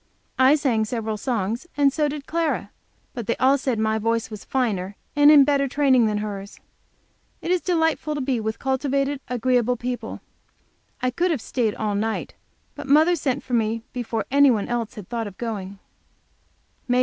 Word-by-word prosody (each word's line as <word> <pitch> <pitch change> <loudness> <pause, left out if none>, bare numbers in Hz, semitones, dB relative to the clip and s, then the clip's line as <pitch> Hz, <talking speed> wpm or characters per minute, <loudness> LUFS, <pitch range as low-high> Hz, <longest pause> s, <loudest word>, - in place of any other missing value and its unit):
I 260 +3 +6
sang 260 -7 +1
several 220 -1 -3
songs, 230 - -2
and 280 -2 +4
so 300 -1 +1
did 290 -1 -6
Clara, 330 -1 -1 0.4
but 235 -5 -6
they 235 - +1
all 265 +2 +4
said 260 -4 -1
my 220 0 +1
voice 230 +1 -1
was 210 -2 -8
finer 205 -7 -1 0.2
and 290 0 +7
in 295 -2 +8
better 280 0 +2
training 260 -4 +3
than 210 -1 0
hers. 205 -1 -6 0.8
It 345 - -3
is 365 -1 +2
delightful 320 -3 0
to - - -2
be 255 -2 0
with 220 0 -3
cultivated, 275 +1 -1
agreeable 250 0 +1
people. 245 +1 -5 0.8
I 255 - +2
could 350 +8 0
have 320 -6 0
stayed 225 -2 -1
all 215 -1 -2
night, 220 +2 -2 0.4
but 290 -1 -8
mother 310 +5 +5
sent 275 -5 -2
for 250 - -7
me 225 -1 0
before 235 -3 -3
any 280 0 +6
one 220 -5 +1
else 235 -2 -3
had 205 -4 -9
thought 230 -2 -3
of 195 - -11
going. 200 -4 -5
250 Hz, 175 wpm, -23 LUFS, 220-280 Hz, 0.8 s, in